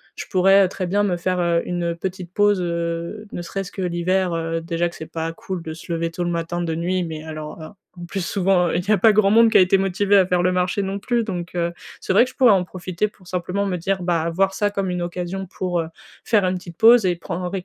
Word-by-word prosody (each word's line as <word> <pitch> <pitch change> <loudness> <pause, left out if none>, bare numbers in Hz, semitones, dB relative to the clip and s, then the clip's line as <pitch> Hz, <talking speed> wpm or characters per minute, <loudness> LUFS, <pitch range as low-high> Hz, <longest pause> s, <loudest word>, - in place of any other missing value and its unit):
je - - -6
pourrais, 195 +1 +5
heu, - - 0
très 185 - -4
bien 200 +3 +1
me 190 -3 +1
faire, 180 +1 -1
heu, 170 -1 +2
une, 175 -1 -2
heu, - - -10
petite 180 0 -6
pause, 205 -2 +3
heu, 170 +4 -3
ne - - -5
serait-ce 195 +2 -5
que 195 - -6
l'hiver, 180 +1 0
heu, 165 0 -2
déjà 170 +1 -1
que - - -14
c'est 160 - -7
pas 165 0 -3
cool 180 +2 -6
de 160 - -6
se 165 +2 -10
lever 165 0 -2
tôt 175 +1 -3
le - - -1
matin, 170 +1 -2
de 165 -2 -2
nuit 180 +2 -1
mais 160 -2 -6
alors, 155 0 -7
heu, 155 - -7 0.3
en 175 -1 -8
plus, 190 0 -3
souvent, 180 -2 +2
il 175 - -1
y - - +5
a 215 - +5
pas 215 +3 +5
grand 205 -1 +4
monde 225 +2 +5
qui - - +6
a - - +8
été 185 +1 +4
motivé 195 +1 +2
à 190 - +5
faire 180 -1 +1
le 185 - +3
marché 180 +2 0
non 195 +1 -3
plus 235 +3 0
donc 180 -5 -5
heu, 170 0 -1 0.3
c'est - - -2
vrai 220 +6 +6
que - - -8
je - - -27
pourrais 250 -4 +6
en 190 -3 +3
profiter 185 +2 -3
pour 195 -3 -19
simplement 180 +3 -2
me 185 -2 -1
dire 190 +2 -1
ah, 170 -1 +1
voir 190 +3 +1
ça, 205 +1 +1
comme 195 -2 -2
une 180 0 -2
occasion 180 +2 -4
pour, 180 -1 -2
heu, 160 - -5 0.4
faire 210 -4 +3
une 185 0 0
petite 175 -2 -12
pause 230 -1 +6
et 175 - +1
prendr 175 +1 -5
180 Hz, 270 wpm, -22 LUFS, 170-195 Hz, 0.4 s, a